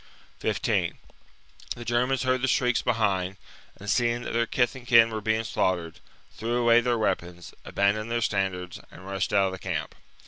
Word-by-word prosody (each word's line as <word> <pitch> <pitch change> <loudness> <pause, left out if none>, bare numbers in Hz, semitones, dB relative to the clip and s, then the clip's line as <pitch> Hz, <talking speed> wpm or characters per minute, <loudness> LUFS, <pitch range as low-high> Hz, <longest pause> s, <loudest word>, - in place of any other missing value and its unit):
15. - - 0 0.8
The 120 - -9
Germans 125 +3 +1
heard 130 -1 +1
the 130 - +1
shrieks 125 -2 +2
behind, 100 -5 0
andannihi 95 - -24
and, 100 - -6
seeing 120 -1 +1
that - - -5
their 115 0 +1
kith 125 0 +1
and 125 -2 -11
kin 115 -2 +6
were 110 -1 -3
being 110 +1 0
slaughtered, 90 -5 -1 0.3
threw 115 +3 -3
away 120 -1 +5
their 120 0 +1
weapons, 90 -4 -2
aban 100 0 +2
doned 110 +2 -5
their 120 0 0
standards, 95 -4 -2
and 95 - -13
rushed 95 0 -2
out 100 -2 +4
of 95 - -1
the 95 - -7
camp. 80 -5 -3
110 Hz, 185 wpm, -26 LUFS, 95-120 Hz, 0.8 s, kin